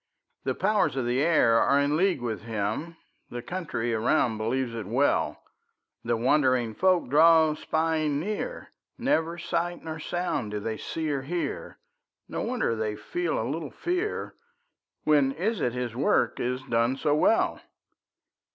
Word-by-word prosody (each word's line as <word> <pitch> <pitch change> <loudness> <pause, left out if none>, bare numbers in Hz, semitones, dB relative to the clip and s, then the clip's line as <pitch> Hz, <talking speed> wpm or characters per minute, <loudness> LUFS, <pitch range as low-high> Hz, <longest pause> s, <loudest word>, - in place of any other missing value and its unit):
The - - 0
powers 200 - +1
of 130 -3 -1
the 125 +2 +1
air 150 -8 +4
are 140 - +3
in 145 +1 +2
league 185 -2 +2
with 115 -3 -3
him; 115 +9 -3 0.3
The 120 0 -6
country 145 -9 -3
around 110 0 +1
believes 120 +2 -1
it 110 -4 -5
well; 130 +7 +1 0.6
The 115 0 0
wondering 130 -2 +2
folk 185 +3 +2
draw 160 +3 +5
spying 155 -2 0
near; 215 - -4 0.3
Never 175 - 0
sight 175 +1 -2
nor 160 -1 -5
sound 165 -8 -2
do 105 0 -3
they 110 +1 -3
see 160 -2 -3
or 140 -2 -1
hear; 170 +6 -4 0.5
No - - -4
wonder 245 - 0
they 110 -1 -2
feel 175 +8 -2
a 110 - -1
little 150 +2 -3
fear; 360 +4 -3 0.7
When 145 -3 +3
is 190 +5 -1
it 120 - 0
his 125 -2 -3
work 130 - +1
is 125 +1 -2
done 120 +1 +1
so 145 +1 +1
well? 155 +9 +2
145 Hz, 150 wpm, -27 LUFS, 120-165 Hz, 0.7 s, draw